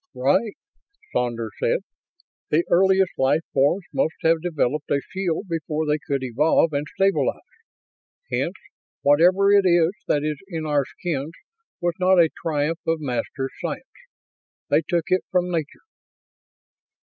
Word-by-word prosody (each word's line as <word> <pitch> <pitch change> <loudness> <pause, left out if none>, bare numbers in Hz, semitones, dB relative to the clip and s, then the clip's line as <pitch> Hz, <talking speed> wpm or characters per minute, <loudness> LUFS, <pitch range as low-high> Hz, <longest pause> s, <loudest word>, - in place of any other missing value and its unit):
"Right," 145 - +1 0.6
Saunders 115 -3 -1
said. - - +1 0.7
"The 160 +3 +3
earliest 190 +1 +4
life 140 +5 +2
forms 145 +7 +2
must 160 - 0
have 165 0 +3
developed 150 -4 -1
a 140 - +2
shield 185 +4 -3
before 160 -2 -2
they 150 0 +1
could 140 -2 -3
evolve 150 +5 +2
and 145 +1 -1
stabilize. 195 0 +2 1.0
Hence, - - -1 0.5
whatever 180 +7 +5
it 200 -2 +5
is 170 -1 +4 0.2
that 145 - +1
is 150 -2 -3
in 165 -4 -4
our 145 -2 +1
skins 160 -2 -4 0.5
was 175 -1 0
not 185 +1 +4
a 165 -2 +5
triumph 160 +1 -1
of 165 0 +1
Masters' 135 -1 -3
science. - - -4 0.9
They - - +4
took 170 +1 -1
it 185 0 +2
from 180 -1 0
Nature." 160 -4 -4
160 Hz, 135 wpm, -23 LUFS, 145-175 Hz, 1.0 s, whatever